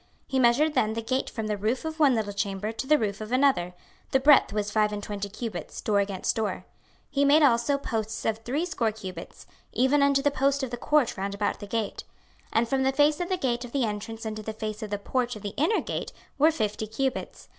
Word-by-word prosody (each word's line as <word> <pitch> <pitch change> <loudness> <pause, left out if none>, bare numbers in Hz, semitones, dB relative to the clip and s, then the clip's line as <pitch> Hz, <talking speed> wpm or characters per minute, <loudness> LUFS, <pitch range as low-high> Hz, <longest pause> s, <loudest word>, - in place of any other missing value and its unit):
26:040:013 - - -35 0.2
He 265 - +1
measured 260 +6 +4
then 220 -6 +1
the 230 - -3
gate 255 +3 -1
from 220 - -4
the 210 -1 -1
roof 225 +8 -1
of 320 0 -5
one 280 -5 +5
little 210 -2 -2
chamber 200 +1 -2
to 230 +4 -5
the 305 +1 +5
roof 210 -3 -2
of 215 +1 -6
another: 255 -10 +2 0.3
the 265 - +3
breadth 285 +1 +6
was 210 0 -2
five 210 -1 +2
and 205 0 -4
twenty 205 -1 -4
cubits, 210 -5 -6
door 205 -2 +1
against 195 -2 -1
door. 220 -2 -2 0.4
26:040:014 - - -44
He 285 -1 +2
made 295 +2 +6
also 260 +1 +3
posts 220 -5 -3
of 220 0 0
threescore 250 -1 -1
cubits, 185 -5 -9 0.3
even 265 +5 +3
unto 280 -1 +3
the 290 - +3
post 275 0 +1
of 255 - -3
the 240 - -3
court 295 -2 +2
round 200 +1 -3
about 205 0 -1
the 205 - -8
gate. 215 -1 -3 0.4
26:040:015 - - -31
And 230 +1 +2
from 270 +2 0
the 265 0 +3
face 295 +2 +3
of 350 0 -2
the 370 - +1
gate 245 -6 -1
of 245 - -9
the 270 -4 +2
entrance 220 +1 -5
unto 215 0 -4
the 220 +1 -5
face 215 0 -5
of 215 - -5
the 205 - -1
porch 245 +4 -1
of 210 - -10
the 205 - -2
inner 330 +9 +2
gate - - -4 0.3
were 305 +3 +6
fifty 215 -8 -2
cubits. 260 +4 -3
230 Hz, 240 wpm, -27 LUFS, 210-275 Hz, 0.4 s, breadth